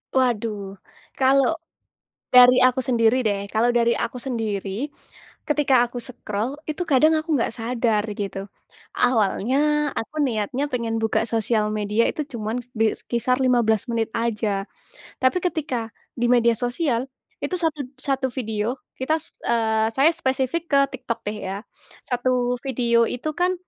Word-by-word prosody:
Waduh, 210 -6 0 0.4
kalau 275 +4 +4 0.8
dari 250 0 +8
aku 255 +1 +4
sendiri 240 0 +3
deh, 200 -2 0
kalau 230 +3 +3
dari 235 0 +3
aku - - -3
sendiri 225 0 -3 0.6
ketika 280 -5 +3
aku 245 0 -6
scroll 235 +1 -4
itu 310 +4 -2
kadang 310 +2 +5
aku 310 -1 -1
enggak 230 - 0
sadar 230 -3 0
gitu. 195 -1 -4 0.5
Awalnya 240 +1 +2 0.4
aku 225 - -7
niatnya 250 +2 -1
pengen 230 -2 -1
buka 220 - +1
sosial 220 -1 +1
media 210 +1 +1
itu - - -4
cuman 225 +1 -3 0.2
bi 225 -1 +3 0.2
kisar 250 +1 +1
15 230 -4 +2
menit 225 -1 0
aja. 215 -4 -1 0.6
Tapi 260 +7 +3
ketika 270 -10 -2 0.3
di 240 - +1
media 235 -1 +4
sosial 245 0 -1 0.4
itu - - -2
satu 315 -3 0 0.2
satu 270 -1 0
video 225 0 -2 0.2
kita 310 +5 +1
se - - -15 0.2
eee, 220 -2 +2
saya 275 +4 +5
spesifik 265 +5 -1
ke 280 - +5 0.2
TikTok 245 -2 -4
deh 210 +1 -2
ya, 195 - -3 0.5
1 245 0 +1
video 235 -3 +2
itu 250 +5 -3
kan 360 +1 +2
240 Hz, 140 wpm, -23 LUFS, 220-260 Hz, 0.8 s, dari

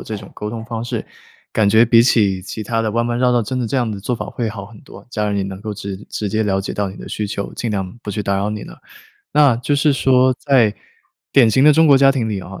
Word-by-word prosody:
这 110 - -6
种 100 -1 -11
沟 105 - -6
通 110 0 -6
方 115 -1 -5
式， - - -4 0.5
感 105 -2 +2
觉 110 +3 +5
比 115 0 +5
起 105 -6 +3
其 110 +3 -7
它 115 +2 -1
的 115 - -1
弯 115 +1 +1
弯 120 0 -1
绕 125 -1 +3
道 120 -1 +2
真 125 +5 -3
的 125 - -1
这 125 - -2
样 120 -4 0
的 105 - -5
做 105 +6 -2
法 120 - -5
会 120 -2 -3
好 105 -2 -7
很 105 +2 -14
多， - - -14
家 105 -3 -2
人 100 - -1
也 100 - 0
能 95 0 -6
够 105 0 -5
直 100 -1 -6
直 105 - -3
接 110 +2 0
了 95 -2 0
解 95 - -5
到 100 -1 -2
你 95 - -10
的 - - -9
需 105 - -3
求， 100 0 -5
尽 120 - -3
量 95 0 -4
不 110 - -12
去 105 +1 -3
打 100 -1 0
扰 100 +1 -1
你 105 -1 -4
呢。 - - -10 0.6
那 145 -5 +5
就 125 +4 -1
是 145 +1 +3
说 130 -1 +3
在 125 -7 +3 0.6
典 125 -5 +5
型 130 +5 +3
的 150 - +7
中 160 +2 +4
国 140 -2 +7
家 135 0 +5
庭 120 -5 -1
里 100 -3 -3
啊， 95 +1 -10
110 Hz, 310 characters per minute, -19 LUFS, 100-125 Hz, 0.6 s, 的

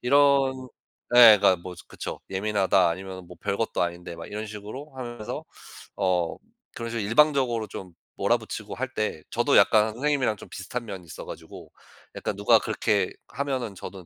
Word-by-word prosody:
이런 135 -1 +3 0.5
예 115 -4 +10
그러니까 95 -2 +5
뭐 90 +1 -9
그쵸. - - -6
"예민하다 95 -2 +2
아니면은 95 +1 -6
뭐 90 - -12
별것도 110 +3 -1
아닌데." 85 0 -4
막 85 - -8
이런 105 +1 -5
식으로 110 +8 -8
하면서 120 -4 -6 0.5
어 90 -4 0 0.4
그런 115 0 -5
식으로 115 -1 -2
일방적으로 125 -2 +3
좀 95 -2 -9 0.2
몰아 - - +2
붙이고 - - -7
할 130 0 -4
때 105 -7 -2
저도 - - +3
약간 110 0 +5
선생님이랑 130 -3 0
좀 - - -12
비슷한 120 +6 -5
면이 95 -4 -7
있어 80 - -9
가지고 - - -10 0.4
약간 - - -3
누가 100 +1 +5
그렇게 - - 0 0.2
하면은 130 -6 -3
저도 95 0 -9
105 Hz, 365 characters per minute, -26 LUFS, 95-125 Hz, 0.5 s, 예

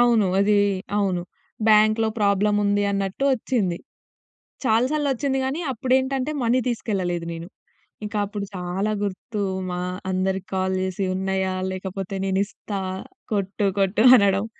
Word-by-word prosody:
అవును. 235 -4 +4
అది 205 +1 +3 0.4
అవును. 185 -3 0 0.5
బ్యాంక్‌లో 215 +1 +5
ప్రాబ్లముంది 205 0 +2
అన్నట్టు 195 +4 -2
ఓచ్చింది. 220 -8 0 0.9
చాలా 225 +1 +4
సార్లొచ్చింది 280 -2 0
గానీ, 270 +5 -2
అప్పుడు 255 +1 -1
ఏంటంటే, 265 +2 -1
మనీ 240 +2 +3
తీసుకెళ్లలేదు 190 -7 -1
నేను. 165 +1 -7 0.6
ఇంక 210 - -6
అప్పుడు 205 0 -4
చాలా 180 +4 -2
గుర్తు 205 +2 -4 0.3
మా 180 0 -3 0.3
అందరికి 190 0 -1
కాల్ 190 0 0
జేసి, 190 +1 -2
ఉన్నాయా, 190 0 -1 0.2
లేకపోతే 190 +1 -5
నేను 190 0 +1
ఇస్తా 200 -1 -6 0.5
కొట్టు, 200 0 0
కొట్టు 195 +2 +2
అనడం. 200 -1 +3
200 Hz, 125 wpm, -23 LUFS, 190-225 Hz, 0.9 s, బ్యాంక్‌లో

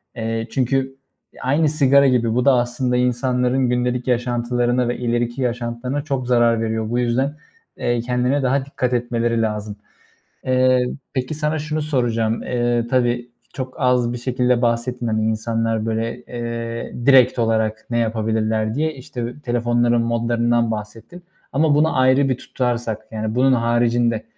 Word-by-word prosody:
Eee, 115 -1 -3
çünkü 135 +1 0 0.5
aynı 145 +4 +2
sigara 140 -2 +4
gibi 120 -3 +2
bu 125 - +1
da 140 - +6
aslında 125 0 0
insanların 125 +1 +1
gündelik 125 0 -1
yaşantılarına 120 0 0
ve 120 - -2
ileriki 120 +1 -1
yaşantılarına 125 +2 -2
çok 135 -4 -3
zarar 120 -2 +3
veriyor. 110 -1 -2
Bu 120 +1 0
yüzden, 130 +5 0 0.4
eee, 120 -1 0
kendine 125 +3 0
daha 135 +1 +1
dikkat 125 -3 -2
etmeleri 120 -1 0
lazım. 105 -1 -3 0.7
Eee, 130 -1 +3 0.3
peki 130 +2 -2
sana 155 +1 -1
şunu 155 +1 -3
soracağım. 115 -6 0
Eee, 120 -1 0
tabii 120 -1 0 0.2
çok 130 -1 -5
az 125 -2 +2
bir 120 - -4
şekilde 125 0 0
bahsettin, 120 +1 -1
hani, 110 -1 0
insanlar 115 0 -1
böyle, 115 +1 -2
eee, 115 -1 -5
direkt 130 -2 +6
olarak 110 -1 0
ne 120 - 0
yapabilirler 110 -1 0
diye. 155 +2 -1
İşte 125 -2 -6
telefonların 120 -1 +1
modlarından 115 0 +1
bahsettin 110 +11 -7 0.3
ama 145 +1 +3
bunu 150 -2 +2
ayrı 130 +2 +4
bir 130 - 0
tutarsak 120 -5 -2
yani, 110 0 -3
bunun 130 +2 +3
haricinde 120 -1 +1
120 Hz, 145 wpm, -20 LUFS, 115-130 Hz, 0.7 s, da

